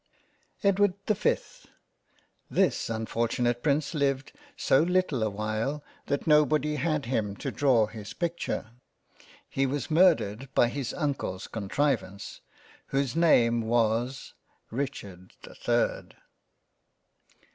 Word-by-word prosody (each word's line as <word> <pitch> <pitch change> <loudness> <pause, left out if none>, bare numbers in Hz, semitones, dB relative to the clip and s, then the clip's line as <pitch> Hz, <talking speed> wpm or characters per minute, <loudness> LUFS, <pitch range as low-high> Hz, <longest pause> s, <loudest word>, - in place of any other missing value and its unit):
EDWARD 200 -1 +3
the 215 - +2
5th - - -2 0.8
THIS - - +1
unfortunate 115 +2 -1
Prince 145 +2 +1
lived 140 -3 0 0.3
so 135 - +3
little 180 -6 +1
a 110 - +1
while 110 +8 -3 0.2
that 140 - -1
nobody 150 0 +3
had 150 0 0
him 110 -5 -1
to - - -4
draw 130 -6 +3
his 105 -1 -9
picture. 170 -9 -3 0.8
He 135 0 0
was 140 +2 -3
mur 175 +2 +7
dered 105 +5 -6
by 120 - +4
his 135 0 -3
Uncle's 140 - -2
Contrivance, 110 -2 -2 0.5
whose 135 -3 -1
name 120 -8 +4
was 115 +3 0 0.4
Richard 105 -8 -5
the - - -11
3rd. - - -1
135 Hz, 115 wpm, -28 LUFS, 110-150 Hz, 0.8 s, mur